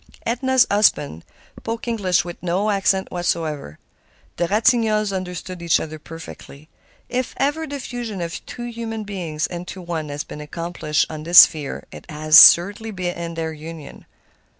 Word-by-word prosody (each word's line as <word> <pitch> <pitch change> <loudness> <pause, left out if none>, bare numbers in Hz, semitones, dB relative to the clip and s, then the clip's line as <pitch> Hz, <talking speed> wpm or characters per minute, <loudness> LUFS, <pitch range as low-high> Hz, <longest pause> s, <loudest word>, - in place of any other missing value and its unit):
Edna's 260 +2 +2
husband 150 - +2 0.4
spoke 230 +1 -5
English 200 -8 +1
with 175 -1 -8
no 185 +4 0
accent 195 -1 0
whatever. 160 - -3 0.6
The 175 - 0
Ratignolles 215 0 +2
understood 180 -1 -6
each 170 -1 +2
other 155 0 -7
perfectly. 155 -1 -12 0.4
If 250 +1 -3
ever 305 +3 -1
the 285 -1 -5
fusion 240 -6 -6
of 170 -1 -5
two 240 - -7
human 230 -2 -5
beings 175 -7 -4
into 180 +2 -7
one 165 -4 -5
has 145 +1 -4
been 150 - -9
accomplished 155 0 -2
on 155 -1 -7
this 170 +3 +9
sphere 150 -3 0
it - - -12
was 155 +1 +9
surely 205 +6 -4 0.2
in 170 -1 -6
their 160 -1 -3
union. 155 0 -10
175 Hz, 150 wpm, -21 LUFS, 160-220 Hz, 0.6 s, this